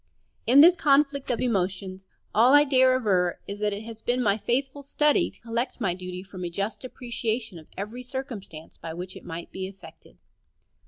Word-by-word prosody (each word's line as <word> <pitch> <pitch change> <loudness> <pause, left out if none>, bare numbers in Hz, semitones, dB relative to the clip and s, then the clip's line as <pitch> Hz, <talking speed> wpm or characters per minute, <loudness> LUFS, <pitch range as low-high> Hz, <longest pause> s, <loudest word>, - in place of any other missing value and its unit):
In 265 +4 +8
this 345 +3 +8
conflict 280 -2 +2
of 245 - 0
emotions 190 -4 -2 0.3
all 245 +6 +6
I 290 - +8
dare 260 -2 +4
aver 185 -8 +1
is 200 +1 -6
that 210 0 +1
it 205 +2 -4
has 225 -1 -9
been 245 +1 0
my 200 -3 +3
faithful 265 +6 -1
study 295 +1 +2
to - - -20
collect 235 +3 -3
my 195 -7 0
duty 180 0 -7
from 190 -2 -9
a 175 - -2
just 200 +8 -3
appreciation 235 -5 -4
of 155 - -16
every 215 +6 -5
circumstance 245 - -7
by 160 -1 -7
which 180 +2 -6
it - - -11
might 165 +1 -7
be 190 0 -4
affected. 195 0 -14
220 Hz, 190 wpm, -26 LUFS, 190-255 Hz, 0.3 s, In